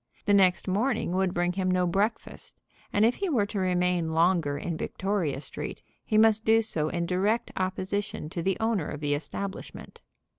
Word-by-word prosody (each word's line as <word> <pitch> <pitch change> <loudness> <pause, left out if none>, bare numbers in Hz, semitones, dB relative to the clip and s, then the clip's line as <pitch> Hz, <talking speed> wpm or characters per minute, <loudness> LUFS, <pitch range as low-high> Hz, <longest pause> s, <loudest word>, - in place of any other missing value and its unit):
The 205 - +3
next 190 -2 +4
morning 215 +1 0
would 190 0 +1
bring 175 0 0
him 185 0 -1
no 185 0 +2
breakfast, 200 +6 -2 0.3
and 205 +2 +3
if 235 - +2
he 395 -1 -1
were 235 -10 +2
to 205 0 -4
remain 180 -3 +1
longer 165 -4 +2
in 170 +3 -3
Victoria 180 -4 -2
Street - - -6 0.2
he 215 - 0
must 220 0 +5
do 225 +1 +4
so 155 -8 -2
in 170 +1 -2
direct 195 +6 0
opposition 190 -1 -2
to 170 - -3
the 190 +2 0
owner 220 -8 0
of 150 - -5
the 145 -1 0
establishment. 190 +6 -6
185 Hz, 180 wpm, -27 LUFS, 175-210 Hz, 0.3 s, must